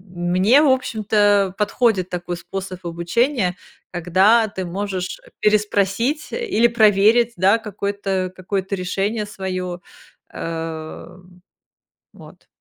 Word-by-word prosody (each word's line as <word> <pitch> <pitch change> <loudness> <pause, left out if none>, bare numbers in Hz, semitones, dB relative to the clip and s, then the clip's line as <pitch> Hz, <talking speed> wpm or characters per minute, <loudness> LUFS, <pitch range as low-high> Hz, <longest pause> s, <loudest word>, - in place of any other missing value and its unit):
мне, 185 +10 +3
в 310 - +4
общем-то, 205 -6 +2
подходит 210 -3 +1
такой 175 -1 -4
способ 185 +1 -7
обучения, 180 - 0 0.4
когда 190 +6 +3
ты 190 -3 -5
можешь 185 0 -4 0.2
переспросить 210 +7 +1
или 420 - +2
проверить, 220 +1 +4
да, 195 +5 +4
какое-то 200 -3 -3
какое-то 190 +1 -3
решение 195 +4 -2
своё, 185 -3 -5 0.5
э, 165 +1 -6 0.9
вот. - - -16
195 Hz, 95 wpm, -21 LUFS, 180-215 Hz, 0.9 s, в